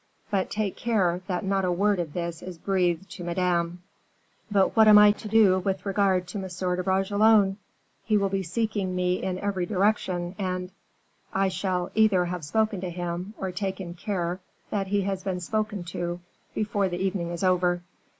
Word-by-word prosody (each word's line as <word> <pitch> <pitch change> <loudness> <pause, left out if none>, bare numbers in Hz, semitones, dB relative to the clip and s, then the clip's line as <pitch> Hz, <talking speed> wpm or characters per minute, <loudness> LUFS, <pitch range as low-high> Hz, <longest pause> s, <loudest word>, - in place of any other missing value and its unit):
But 195 -2 0
take 210 -2 -2
care 190 -7 +1
that 180 -1 -2
not 195 0 +1
a 180 - +1
word 200 +2 +2
of 160 -4 -3
this 170 -1 -4
is 180 -2 -8
breathed 180 -1 0
to 175 - -7
Madame." 175 0 -1 0.7
"But 200 -2 +2
what 220 -1 +6
am 210 -1 +9
I 210 0 +8
to 215 - -7
do 205 -4 +5
with 190 0 -2
regard 195 -2 +1
to 200 - -4
M. 180 -1 -2
de 180 - -2
Bragelonne? 195 +2 +3 0.5
He 215 -1 +2
will 200 -1 +2
be 195 0 -1
seeking 195 0 -2
me 180 0 0
in 185 -1 -2
every 190 -2 -2
direction, 185 -3 0
and 185 -1 -3 0.3
" - - -42 0.3
"I 195 0 +3
shall 185 -2 -2
either 210 -5 +4
have 175 -1 -4
spoken 215 +4 0
to 185 - -3
him, 175 +3 -4
or 190 -1 -3
taken 190 -2 -4
care 180 -1 -3 0.3
that 195 -2 -1
he 200 +1 +1
has 195 -1 -2
been 185 -2 -2
spoken 210 +1 -2
to, 175 0 -3 0.4
before 205 -2 0
the 175 - -3
evening 185 -2 -1
is 175 +2 -4
over." 180 -1 +2
190 Hz, 185 wpm, -26 LUFS, 180-200 Hz, 0.7 s, am